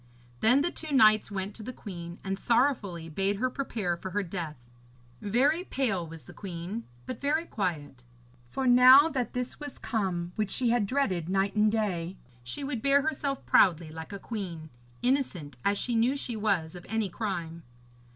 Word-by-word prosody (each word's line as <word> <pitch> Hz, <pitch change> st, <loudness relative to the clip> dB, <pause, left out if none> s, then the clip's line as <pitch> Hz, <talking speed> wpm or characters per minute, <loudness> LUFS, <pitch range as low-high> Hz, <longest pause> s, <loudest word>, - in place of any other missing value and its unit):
Then 250 Hz, +5 st, +5 dB
the 345 Hz, -, 0 dB
two 315 Hz, -1 st, -7 dB
knights 215 Hz, -6 st, +5 dB
went 200 Hz, 0 st, -4 dB
to 225 Hz, -, -10 dB
the 220 Hz, -, -5 dB
queen 175 Hz, -7 st, -8 dB
and 195 Hz, 0 st, -3 dB
sorrowfully 215 Hz, -, +1 dB
bade 195 Hz, +5 st, 0 dB
her 255 Hz, +5 st, -1 dB
prepare 220 Hz, -10 st, -2 dB
for 180 Hz, +2 st, -7 dB
her 205 Hz, +2 st, -1 dB
death. 165 Hz, -8 st, -6 dB, 0.6 s
Very 275 Hz, -, +2 dB
pale 220 Hz, -, -1 dB
was 165 Hz, -1 st, -10 dB
the -, -, -13 dB
queen, 190 Hz, +4 st, -6 dB, 0.2 s
but 250 Hz, -, -6 dB
very 305 Hz, +4 st, +1 dB
quiet, 150 Hz, -, -3 dB, 0.4 s
for 265 Hz, -, -3 dB
now 255 Hz, +4 st, +8 dB
that 255 Hz, -6 st, -2 dB
this 250 Hz, 0 st, -4 dB
was 290 Hz, -2 st, -7 dB
come 180 Hz, -6 st, -2 dB
which 210 Hz, -2 st, 0 dB
she 240 Hz, +3 st, +1 dB
had 235 Hz, -4 st, +2 dB
dreaded 190 Hz, -, 0 dB
night 195 Hz, +1 st, +1 dB
and 210 Hz, 0 st, +4 dB
day, 190 Hz, -5 st, -1 dB, 0.3 s
she 120 Hz, -, -5 dB
would 270 Hz, -5 st, -3 dB
bear 280 Hz, +2 st, +4 dB
herself 285 Hz, -3 st, -2 dB
proudly 165 Hz, -4 st, +4 dB
like 160 Hz, +2 st, -8 dB
a 200 Hz, -, -5 dB
queen, 180 Hz, -8 st, -6 dB, 0.3 s
innocent 245 Hz, -, 0 dB
as 200 Hz, 0 st, +2 dB
she 245 Hz, -, -1 dB
knew 235 Hz, +5 st, +2 dB
she 240 Hz, -4 st, -3 dB
was 195 Hz, -7 st, 0 dB
of 175 Hz, -, -9 dB
any 220 Hz, -1 st, 0 dB
crime. 170 Hz, -4 st, -4 dB
205 Hz, 180 wpm, -29 LUFS, 175-255 Hz, 0.6 s, now